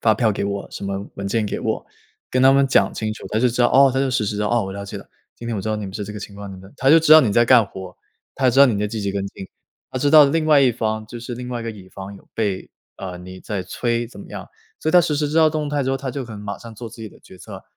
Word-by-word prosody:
发 110 -1 +3
票 110 0 +2
给 100 - -3
我， 100 0 -4
什 - - -7
么 100 +1 -4
文 100 - -4
件 110 +2 0
给 - - -3
我。 - - -3 0.4
“跟 130 0 +1
他 135 - +7
们 140 0 +4
讲 130 - +3
清 110 -1 -3
楚， - - -12
他 110 - -1
就 125 - +3
知 120 +1 0
道： 120 - +5
“哦。” 135 +1 +6
他 135 - +1
就 135 -1 0
实 110 -3 0
时 105 +1 -2
地： 105 - -1
“哦， 120 -3 +1
我 95 - -6
了 100 0 -6
解 100 - -7
了， - - -14 0.3
今 115 - -9
天 115 -2 -2
我 - - -2
知 110 - -4
道 110 - 0
你 105 -2 -5
们 95 - -9
是 105 - -4
这 105 - -7
个 105 - -7
情 100 -1 -9
况， 100 -1 -8
你 - - -9
们” 95 +1 -13
他 135 +1 +3
就 165 - +8
知 155 -1 +4
道 155 - +10
你 110 -7 +1
在 120 +2 +4
干 120 -2 +6
活 95 -2 -9
儿， - - -26 0.4
他 130 -1 0
就 - - +5
知 - - +3
道 140 - +9
你 115 - 0
在 105 +1 -1
积 110 +1 -4
极 100 -1 -2
跟 100 -1 -2
进， 95 - -10 0.5
他 130 - -2
知 145 +1 +2
道 155 -2 +9
另 155 +3 +1
外 150 -2 +5
一 130 -3 +4
方 110 -1 -3
就 120 +1 -9
是 120 0 -6
另 125 0 -7
外 120 -1 -4
一 - - -7
个 115 - -3
乙 100 -4 -12
方 100 +1 -9
有 - - -20
被 100 -4 -2 0.3
呃， 90 -2 -7
你 95 +1 -10
在 100 -3 -4
催 120 +2 -2
怎 115 - -14
么 - - -11
样。 - - -8 0.3
所 - - -2
以 - - +1
他 180 - +8
实 160 -3 0
时 145 0 0
知 155 - -3
道 160 -1 +6
动 155 -1 -2
态 145 -2 -1
之 130 - 0
后， 135 - 0
他 135 -1 -5
就 130 +1 -5
可 115 - -10
能 105 - -8
马 100 0 -6
上 115 -2 -11
做 115 +2 -8
自 110 - -13
己 110 -2 -8
的 - - -19
决 95 - -16
策， - - -10
115 Hz, 375 characters per minute, -21 LUFS, 100-130 Hz, 0.5 s, 道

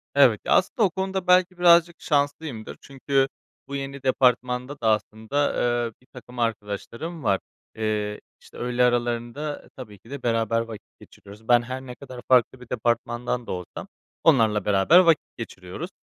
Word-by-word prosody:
Evet. - - +5
Ya, - - -2
aslında 235 - +2
o 200 - +4
konuda 190 +1 -3
belki 180 0 +4
birazcık 170 -1 +5
şanslıyımdır. 145 -5 -2
Çünkü 135 0 0 0.4
bu 140 - -5
yeni 140 0 -6
departmanda 125 +1 +1
da 115 - 0
aslında, 110 +6 0 0.3
eee, 115 - -4
birtakım 125 -1 -13
arkadaşlarım 115 - -4
var. 100 -1 +2 0.4
Eee, 105 -1 -2 0.2
işte, - - -16
öğle 125 0 0
aralarında 120 +4 -1
tabii 105 -6 -10
ki 115 - -19
de 140 -1 -7
beraber 115 -1 +1
vakit 115 -2 -9
geçiriyoruz. 105 +3 -15
Ben 120 -1 +5
her 130 +2 -6
ne 125 -2 -9
kadar 130 -2 -10
farklı 130 0 +3
bir 125 - -13
departmandan 120 0 -1
da - - -4
olsam 90 -1 -6 0.4
onlarla 115 - +4
beraber 105 - +5
vakit 165 -4 +4
geçiriyoruz. 105 - -7
125 Hz, 155 wpm, -24 LUFS, 115-145 Hz, 0.4 s, Evet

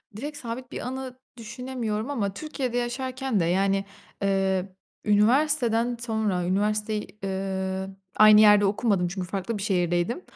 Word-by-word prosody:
Direkt 290 +6 -6
sabit 245 +1 -6
bir - - -5
anı 260 0 -6 0.2
düşünemiyorum. 235 0 -4
Ama 205 -8 -2
Türkiye'de 260 -2 -3
yaşarken 255 -1 -2
de, 165 - +2
yani, 195 +3 +1 0.4
ııı, 195 -1 +1 0.4
üniversiteden 235 +2 +3
sonra 220 -6 -1
üniversiteyi, 210 +3 0 0.2
ııı, 190 0 -3 0.2
aynı 215 0 +8
yerde 210 -1 +7
okumadım 200 -3 +1
çünkü 180 0 -5
farklı 195 +4 -3
bir 200 - -4
şehirdeydim. 180 - 0
215 Hz, 125 wpm, -26 LUFS, 195-245 Hz, 0.4 s, aynı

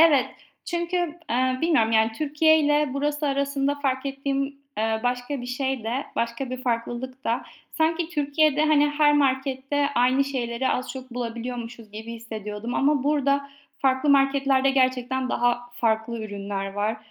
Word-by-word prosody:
Evet, 290 -6 +6 0.4
çünkü, 345 +1 -2 0.3
eee, 255 +2 +1
bilmiyorum, 290 -10 +3
yani, 220 0 +3
Türkiye 310 +5 +3
ile 295 -1 +2
burası 295 +1 -1
arasında 280 0 0
fark 275 -2 -1
ettiğim, 275 0 -1 0.3
eee, 220 0 0
başka 245 +2 -1
bir 245 - -6
şey 260 -1 -2
de 250 +5 -2
başka 235 +3 -2
bir 255 0 -5
farklılık 250 +2 -3
da; 235 +2 0 0.3
sanki 325 +1 +1
Türkiye'de 300 -1 +2
hani 295 -1 +4
her 295 0 +4
markette 275 0 +1
aynı 255 +3 +3
şeyleri 255 -2 -2
az 255 - -1
çok 260 -1 -9
bulabiliyormuşuz 235 -1 -5
gibi 220 +2 -7
hissediyordum 220 0 -6
ama 280 -1 +2
burada 280 -1 +1 0.3
farklı 265 +1 +2
marketlerde 275 -1 +3
gerçekten 260 -1 +1
daha 245 0 0
farklı 225 0 0
ürünler 200 -1 -4
var. 210 +2 -1
260 Hz, 145 wpm, -25 LUFS, 235-285 Hz, 0.4 s, Evet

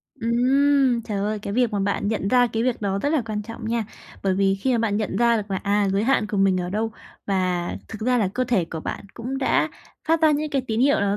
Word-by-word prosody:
Ừm. 255 +1 +2
Trời 210 -3 -3
ơi, 210 +2 -1
cái 200 -1 -5
việc 245 -1 +1
mà 205 - 0
bạn 200 +1 0
nhận 210 -3 -1
ra 245 0 +4
cái 225 0 -2
việc 250 -2 0
đó 195 -1 0
rất 285 - 0
là 300 - +2
quan 210 -1 -3
trọng 225 0 -7
nha. 230 -1 0 0.4
Bởi 190 -1 +1
vì 195 0 +2
khi 255 +7 -1
mà 235 - +2
bạn 215 -3 0
nhận 215 -1 -2
ra 235 -1 +4
được 210 -1 -4
là, 190 - 0
à, 200 +1 +1
giới 200 +3 +1
hạn 250 -4 +2
của 210 - -3
mình 195 -1 +3
ở 180 0 -4
đâu 220 +2 -1 0.4
và 185 -3 0 0.2
thực 220 - -8
ra 245 +2 +2
là 200 -4 +1
cơ 255 - +1
thể 230 -8 +1
của 165 -1 -6
bạn - - -5
cũng 250 +3 -4
đã 265 - +2 0.4
phát 325 0 +3
ra 315 - +6
những 300 +1 0
cái 270 -2 0
tín 225 0 -1
hiệu 280 +2 +4
đó 200 0 +1
220 Hz, 270 wpm, -23 LUFS, 200-250 Hz, 0.4 s, ra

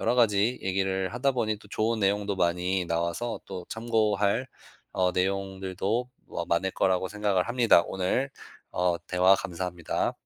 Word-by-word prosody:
여러 - - +2
가지 115 0 +3
얘기를 95 0 -1
하다 135 +3 +1
보니 110 -4 0
또 - - -16
좋은 110 +2 0
내용도 100 0 +1
많이 90 +1 +1
나와서 85 +7 -2
또 90 -1 -6
참고할 110 0 +1 0.5
어 90 -1 +2
내용들도 95 +5 -1 0.2
뭐 85 - -4
많을 90 +3 +1
거라고 95 0 +1
생각을 105 -2 0
합니다. 120 -7 +5
오늘 95 +9 -1 0.4
어 90 -1 +1
대화 90 +1 +5
감사합니다. 90 -2 -2
95 Hz, 310 characters per minute, -27 LUFS, 90-110 Hz, 0.5 s, 합니다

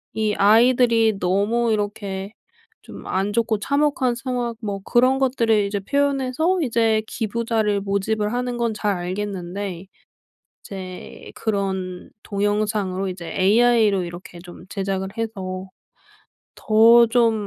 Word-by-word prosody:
이 215 -1 0
아이들이 225 0 +4
너무 205 +6 +1
이렇게 205 -1 -4 0.5
좀 - - -12
안 195 +2 -1
좋고 225 -1 0
참혹한 280 -1 +1
상황 245 -1 -3
뭐 200 -3 -4
그런 255 +2 +3
것들을 230 -5 +2
이제 200 0 -2
표현해서 280 - 0
이제 225 -5 +1
기부자를 220 -2 -1
모집을 210 +2 -1
하는 245 0 -2
건 235 -2 0
잘 210 -1 -1
알겠는데 185 0 -5 0.8
이제 185 -2 -9
그런 190 -4 -3
동영상으로 205 -2 -1
이제 175 -2 -7
AI로 215 0 +3
이렇게 175 0 -10
좀 175 0 -12
제작을 195 -1 -3
해서 190 -4 -5 0.9
더 230 +2 +6
좀 230 -1 +3
215 Hz, 250 characters per minute, -22 LUFS, 195-235 Hz, 0.9 s, 더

